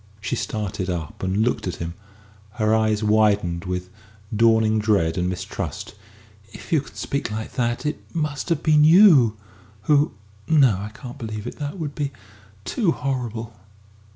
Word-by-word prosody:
She - - -2
started 100 -3 -3
up 85 -4 -4
and 95 +3 +1
looked 120 -4 -1
at 90 - -3
him, 85 0 -5 0.6
her 110 0 +1
eyes 110 -1 +2
widened 105 -5 +2
with 90 0 -4 0.4
dawning 110 -1 +4
dread 100 -7 +2
and 90 0 0
mistrust. 95 +1 -5 0.6
"If - - -12
you 160 -4 +4
can - - -15
speak 140 -3 -3
like 110 +1 -5
that," 120 -1 -1
she 150 - +1
said, 150 - -3
"it - - -25
must 150 0 -2
have 165 -2 0
been 155 -1 +5
you 155 - +7 0.5
who 150 0 +3 0.3
no, 140 -9 +5
I 100 +2 -5
can't 125 +4 -10
believe 110 -3 -5
it - - -6
that 145 +5 -4
would 150 -4 -4
be 145 -2 -2 0.5
too 210 -9 +1
horrible!" 120 -4 -3
110 Hz, 165 wpm, -23 LUFS, 105-145 Hz, 0.6 s, you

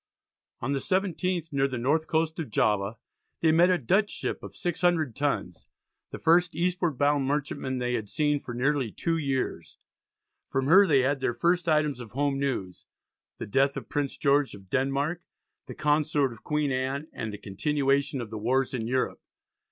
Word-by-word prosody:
On 130 - -2
the 140 - 0
17th, 185 -2 -1
near 135 0 +2
the 130 -2 -4
north 150 +7 +1
coast 160 +1 0
of 160 - -4
Java, 105 0 +1 0.4
they 160 - +4
met 170 +3 +5
a 180 - +4
Dutch 190 - +2
ship - - -4
of - - -10
600 175 - 0
tons 105 - -2 0.4
the - - -7
first 170 +1 +3
eastward 175 -3 0
bound 145 -1 +2
merchantman 140 -2 -2
they 125 0 -1
had 110 -4 -3
seen 150 -1 +1
for 120 -3 -7
nearly 135 -2 0
two 165 +8 -1
years. 135 -4 -3 0.7
From 135 0 0
her 190 +7 +7
they 140 -5 +4
had 135 +2 +1
their 120 -2 -1
first 175 +6 +1
items 150 -4 +2
of 115 -4 -10
home 140 +1 0
news, 120 -10 -3 0.5
the - - -5
death 135 +6 +1
of - - -7
Prince 145 -2 -2
George 140 -3 +2
of 95 -2 -16
Denmark, 140 +6 0 0.5
the - - -8
Consort 150 -3 +1
of 110 - -16
Queen 150 -2 0
Anne, 135 +3 -2
and 110 -2 -4
the 105 - -6
continuation 140 +6 0
of 115 -2 -7
the 110 - -5
wars 130 +4 +1
in 115 -3 -2
Europe. 130 +1 -1
140 Hz, 180 wpm, -27 LUFS, 125-160 Hz, 0.7 s, her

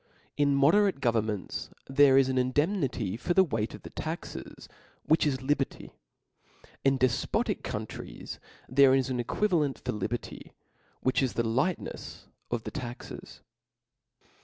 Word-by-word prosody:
In 145 -1 +3
mode 140 +3 +5
rate 205 -6 +3
governments 110 -5 -1 0.2
there 135 0 +6
is 135 -1 +5
an 130 -1 +1
indemnity 130 - 0
for 175 +8 -1
the 190 - +7
weight 110 - -2
of - - -14
the - - -9
taxes, - - -6 0.4
which 155 0 +3
is 130 -3 -1
liberty. 140 0 -1 0.9
In 135 0 +3
defpotic 130 -2 0
countries - - -6 0.2
* - - -27
there 135 -1 +8
is 135 -1 +1
an 125 - -1
equivalent 150 - +1
far - - -1
liberty, 110 +3 -5 0.5
which, 130 - +2
is 130 -3 0
the 115 - 0
lightnefs 130 +11 -2 0.2
of 120 -2 -2
the - - -5
taxes. 125 -4 -8
135 Hz, 140 wpm, -29 LUFS, 120-145 Hz, 0.9 s, there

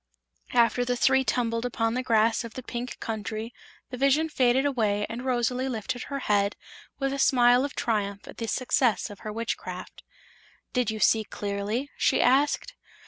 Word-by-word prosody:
After 240 +1 +4
the 245 0 0
three 265 +2 +4
tumbled 230 -2 0
upon 225 -2 -1
the 255 - 0
grass 225 -1 +2
of 230 -1 -9
the 255 - -6
Pink 245 +1 -5
Country 220 +1 -4 0.4
the 250 - -5
vision 275 +5 +3
faded 260 -1 +2
away 215 -7 +1
and 235 +2 -6
Rosalie 255 +1 0
lifted 245 +1 -4
her 280 - -4
head 205 -2 +1 0.4
with 275 -1 -1
a 275 - -3
smile 245 -1 +5
of 280 - -4
triumph 205 -3 -2
at - - -11
the 230 - -4
success 245 -1 +1
of 205 - -11
her 215 - -6
witchcraft. 230 +2 -5 0.7
"Did 250 -3 +1
you 220 0 -3
see 220 +1 +4
clearly?" 205 +7 -3
she - - +2
asked. 290 - +2
240 Hz, 170 wpm, -27 LUFS, 220-255 Hz, 0.7 s, smile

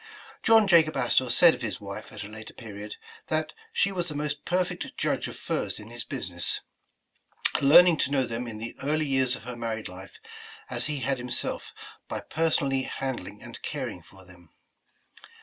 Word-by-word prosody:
John 225 -1 +6
Jacob 165 -5 +5
Astor 125 0 +3
said 170 +4 +7
of 125 - -7
his 115 -3 -3
wife 100 +1 -7
at - - -6
a - - -7
later 110 +1 -10
period, 105 -3 -7 0.3
that 155 0 0 0.2
she 200 - +2
was 175 -2 -2
the 150 - -5
most 150 0 -3
perfect 180 0 -1
judge - - 0
of - - -8
furs - - -2
in 105 +2 -10
his 120 0 -5
business, 90 -10 -1 1.0
learning 165 +4 +8
to 130 - +1
know 135 -2 +2
them 120 +1 -4
in 110 -2 -6
the 115 +2 -6
early 155 +2 +1
years 130 -2 +2
of - - -11
her 125 +1 -5
married 115 -2 -3
life, 90 0 -11 0.5
as - - +1
he 150 -3 -2
had 135 +1 0
himself, 125 0 -3 0.4
by - - -3
personally 145 -4 +1
handling 130 -1 -4
and - - -9
caring - - -4
for 95 -1 -17
them. 90 -2 -17
130 Hz, 180 wpm, -28 LUFS, 110-155 Hz, 1.0 s, learning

